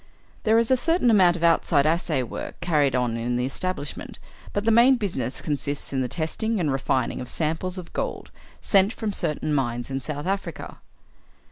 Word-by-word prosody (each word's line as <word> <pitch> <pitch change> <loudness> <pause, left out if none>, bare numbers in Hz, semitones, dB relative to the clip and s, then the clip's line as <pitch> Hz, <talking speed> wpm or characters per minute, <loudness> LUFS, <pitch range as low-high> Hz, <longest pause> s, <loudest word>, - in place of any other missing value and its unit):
There 220 +1 +5
is 230 +2 +2
a 260 - +5
certain 325 -2 +2
amount 185 -5 +5
of 170 - -5
outside 165 -3 +3
assay 155 -4 +1
work 120 - -7
carried 150 -6 +2
on 120 -2 0
in 120 +1 -2
the 125 +1 0
establishment, 165 +2 -4 0.3
but 205 +1 -2
the 225 - +4
main 240 +4 +6
business 185 - -3
consists 145 -1 -3
in 135 - 0
the 125 - -1
testing 185 - -2
and 155 -5 +1
refining 130 -2 -1
of 125 - -6
samples 165 +6 -2
of 180 -2 -8
gold - - -4 0.3
sent 195 +2 +3
from 215 -4 -3
certain 155 -2 -1
mines 120 -2 -1
in 135 0 -2
South 145 +2 -4
Africa. 195 +1 -4
160 Hz, 180 wpm, -24 LUFS, 135-200 Hz, 0.3 s, main